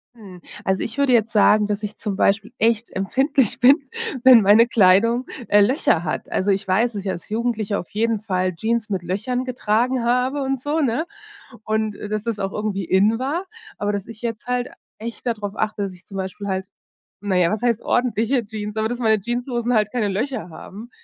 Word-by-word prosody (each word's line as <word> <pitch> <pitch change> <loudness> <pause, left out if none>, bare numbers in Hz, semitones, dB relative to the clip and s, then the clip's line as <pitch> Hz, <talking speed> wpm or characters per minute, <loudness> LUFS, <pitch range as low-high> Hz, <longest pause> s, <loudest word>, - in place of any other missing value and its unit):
Hm, 190 -6 -13 0.2
also, 190 0 0
ich 225 - -4
würde 280 -2 +2
jetzt 230 -1 +2
sagen, 210 0 +4
dass 210 0 -3
ich 210 0 -5
zum 200 -2 -3
Beispiel 200 +1 +1
echt 230 0 +1
empfindlich 260 +5 +1
bin, 275 +2 +5 0.3
wenn 255 -3 +8
meine 210 +3 +6
Kleidung, 230 +3 +4 0.2
äh, 205 - +6
Löcher 200 - +2
hat. - - -4
Also, 200 +2 +1
ich 195 +1 0
weiß, 220 +5 +1
dass 200 - -5
ich 195 - -1
als 170 -2 -7
Jugendlicher 220 -2 -1
auf 175 - -9
jeden 225 0 0
Fall 185 -4 -1
Jeans 225 +5 -1
mit 190 -4 -2
Löchern 215 +8 -2
getragen 250 0 0
habe 250 +4 +1
und 270 -1 -2
so, 295 +4 -1
ne? 270 +1 0 0.6
Und, 220 -1 -1
dass 210 +1 -4
das 230 -3 -3
auch 195 -1 -3
irgendwie 205 -3 -2
in 205 +6 +3
war, 295 +8 -2 0.3
aber 205 0 -1
das 200 -1 -4
ich 225 -1 -10
jetzt 235 0 -5
halt 250 0 -1 0.3
echt 230 +3 -7
da 240 - +1
drauf 205 -2 -6
achte, 215 -1 -2
dass 195 -2 -3
ich 180 0 -17
zum 195 - -12
Beispiel 190 +2 -5
halt 190 -1 -2 0.6
na 200 -2 -1
ja, 175 -2 +3
was 215 - -2
heißt 235 -2 +1
ordentliche 240 +1 +1
Jeans, 210 0 -6
aber 220 0 0
das 245 +1 -4
meine 220 -3 +3
Jeanshosen 240 +2 -2
halt 215 -2 +2
keine 225 -4 0
Löcher 215 0 -3
haben. 210 +8 -10
220 Hz, 205 wpm, -21 LUFS, 200-245 Hz, 0.6 s, wenn